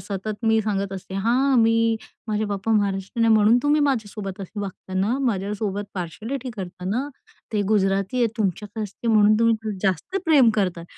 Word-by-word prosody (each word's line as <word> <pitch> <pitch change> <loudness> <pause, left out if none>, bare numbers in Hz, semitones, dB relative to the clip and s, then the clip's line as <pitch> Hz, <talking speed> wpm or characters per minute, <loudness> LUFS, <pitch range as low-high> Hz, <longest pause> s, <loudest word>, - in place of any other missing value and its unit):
सतत 205 +3 -5
मी 225 0 +4
सांगत 200 -2 -2
असते. 190 0 -7
"हां, 250 +7 +2
मी 230 0 +3 0.3
माझे 215 0 0
पापा 205 +1 -2
महाराष्ट्रीयन 200 +1 0
आहे, 225 - +5
म्हणून 215 +2 +5
तुम्ही 295 +1 +3
माझ्यासोबत 215 -8 -2
असे 195 +2 -6
वागता 190 -1 -7
ना. 200 +6 +1
माझ्यासोबत 205 -4 -2
पार्शलिटी 215 +9 -5
करता 180 -2 -7
ना. 255 +7 -1 0.4
ते 210 -1 +1
गुजराती 195 +1 +1
आहे, 240 - +4
तुमच्याकडे 210 +1 -2
असते 210 +3 -5
म्हणून 215 -1 +5
तुम्ही 230 0 +4
त 215 - -2
जास्त 190 - -1
प्रेम 285 -8 +5
करताय." 180 -5 -1
210 Hz, 170 wpm, -23 LUFS, 195-230 Hz, 0.4 s, आहे